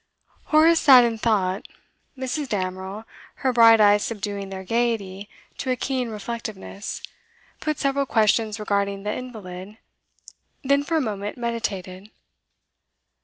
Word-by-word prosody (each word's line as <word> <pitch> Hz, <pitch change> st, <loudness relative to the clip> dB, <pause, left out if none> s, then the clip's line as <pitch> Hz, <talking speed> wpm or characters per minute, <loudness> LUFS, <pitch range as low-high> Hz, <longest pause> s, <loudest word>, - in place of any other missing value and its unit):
Horace 320 Hz, +2 st, +5 dB
sat 260 Hz, -5 st, +8 dB
in 230 Hz, -2 st, -1 dB
thought. 200 Hz, -4 st, 0 dB, 0.5 s
Mrs. 260 Hz, +2 st, -3 dB
Damerel, 190 Hz, +1 st, -4 dB, 0.4 s
her 260 Hz, -, +3 dB
bright 230 Hz, -1 st, +7 dB
eyes 205 Hz, 0 st, +5 dB
subduing 200 Hz, -3 st, -4 dB
their 190 Hz, -1 st, -6 dB
gaiety 205 Hz, -2 st, -1 dB, 0.3 s
to 260 Hz, -, -3 dB
a 255 Hz, -, +2 dB
keen 255 Hz, -1 st, -2 dB
reflectiveness, 215 Hz, -2 st, -6 dB, 0.6 s
put 305 Hz, -2 st, -2 dB
several 275 Hz, 0 st, 0 dB
questions 220 Hz, -1 st, +2 dB
regarding 200 Hz, -1 st, -1 dB
the 210 Hz, +1 st, -2 dB
invalid, 210 Hz, -5 st, -8 dB, 0.9 s
then 280 Hz, +1 st, +3 dB
for 325 Hz, +3 st, 0 dB
a -, -, +2 dB
moment 205 Hz, -3 st, -4 dB
meditated. 205 Hz, -5 st, -4 dB
220 Hz, 120 wpm, -24 LUFS, 200-250 Hz, 0.9 s, sat